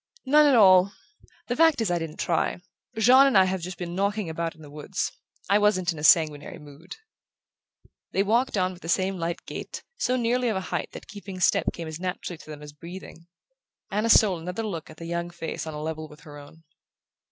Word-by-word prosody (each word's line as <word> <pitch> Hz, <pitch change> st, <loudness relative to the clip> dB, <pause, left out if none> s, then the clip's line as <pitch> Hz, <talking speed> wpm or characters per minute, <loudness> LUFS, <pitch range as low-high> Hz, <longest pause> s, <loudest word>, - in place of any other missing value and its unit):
"None 300 Hz, +3 st, +5 dB
at 280 Hz, -, +5 dB
all. 190 Hz, -2 st, +6 dB, 0.5 s
The 245 Hz, -, -1 dB
fact 325 Hz, -1 st, +4 dB
is 220 Hz, -5 st, 0 dB
I 175 Hz, -, +1 dB
didn't 165 Hz, -1 st, -6 dB
try. 170 Hz, -, 0 dB, 0.4 s
Jean 255 Hz, +5 st, +6 dB
and 265 Hz, -, +3 dB
I 190 Hz, -, +7 dB
have 185 Hz, -1 st, -2 dB
just 180 Hz, +1 st, -6 dB
been 175 Hz, -1 st, -5 dB
knocking 200 Hz, -1 st, -1 dB
about 165 Hz, +1 st, -3 dB
in 160 Hz, -, -16 dB
the 145 Hz, -, -12 dB
woods. 150 Hz, 0 st, -4 dB, 0.4 s
I 200 Hz, +2 st, +4 dB
wasn't 190 Hz, -4 st, +2 dB
in 160 Hz, -, -9 dB
a -, -, -7 dB
sanguinary 155 Hz, -2 st, +3 dB
mood." 150 Hz, +3 st, -12 dB, 1.2 s
They 195 Hz, -, +1 dB
walked 230 Hz, +3 st, +1 dB
on 185 Hz, 0 st, 0 dB
with 180 Hz, -, -15 dB
the 165 Hz, -, -8 dB
same 190 Hz, +1 st, 0 dB
light 170 Hz, +1 st, -4 dB
gait, -, -, -7 dB
so 250 Hz, -, 0 dB
nearly 245 Hz, 0 st, +1 dB
of 215 Hz, -, -1 dB
a 190 Hz, -, -5 dB
height -, -, -2 dB
that -, -, -9 dB
keeping 195 Hz, -2 st, -9 dB
step 180 Hz, -, +2 dB
came 165 Hz, -1 st, -7 dB
as 160 Hz, 0 st, -7 dB
naturally 180 Hz, -2 st, -5 dB
to -, -, -15 dB
them 150 Hz, -1 st, -9 dB
as 145 Hz, 0 st, -10 dB
breathing. 170 Hz, +1 st, -11 dB, 0.6 s
Anna 210 Hz, +3 st, 0 dB
stole 200 Hz, -6 st, +5 dB
another 180 Hz, +6 st, -5 dB
look 175 Hz, -7 st, -5 dB
at 155 Hz, -, -13 dB
the 165 Hz, -, -8 dB
young 170 Hz, +1 st, -3 dB
face 165 Hz, -2 st, -6 dB
on 155 Hz, -, -6 dB
a 150 Hz, -, -5 dB
level 155 Hz, 0 st, -4 dB
with 150 Hz, 0 st, -16 dB
her 150 Hz, -1 st, -12 dB
own. 155 Hz, +3 st, -15 dB
180 Hz, 220 wpm, -26 LUFS, 160-205 Hz, 1.2 s, I